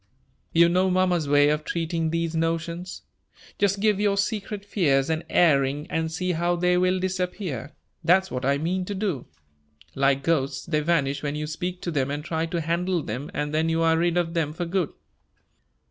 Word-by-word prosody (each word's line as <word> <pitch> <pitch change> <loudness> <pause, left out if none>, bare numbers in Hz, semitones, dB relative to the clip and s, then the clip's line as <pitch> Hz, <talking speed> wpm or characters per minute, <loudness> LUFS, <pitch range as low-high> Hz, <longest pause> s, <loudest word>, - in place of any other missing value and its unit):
You 170 +1 +6
know 185 +2 +2
mamma's 180 -4 +1
way 145 0 +5
of 150 0 0
treating 165 -1 -1
these 165 0 -1
notions. 165 +2 -2 0.6
'Just 200 -1 +2
give 210 -1 +2
your 205 -1 +2
secret 205 0 -2
fears 145 -8 +1
an 160 +1 -1
airing, 145 -3 +3
and 160 0 -1
see 180 +3 -1
how 175 +1 +1
they 180 +1 +2
will 185 +1 +2
disappear,' 180 - -3 0.3
that's 190 +2 +3
what 125 +1 -3
I 140 +2 +2
mean 180 +5 -1
to 205 - -4
do. 190 - -2 0.7
Like 140 0 +2
ghosts, 135 -4 0
they 155 -2 0
vanish 150 -3 +1
when 145 0 -3
you 150 0 -3
speak 180 +4 -4
to 170 - -2
them 140 -3 0
and 145 +1 -4
try 165 0 -1
to 170 0 -2
handle 170 +1 0
them, 125 +7 -5
and 150 0 -2
then 160 +1 +1
you 165 0 +1
are 165 0 +4
rid 170 +1 +1
of 170 -1 0
them 160 -3 -1
for 175 +2 -3
good." 175 -2 -1
165 Hz, 190 wpm, -25 LUFS, 150-180 Hz, 0.7 s, You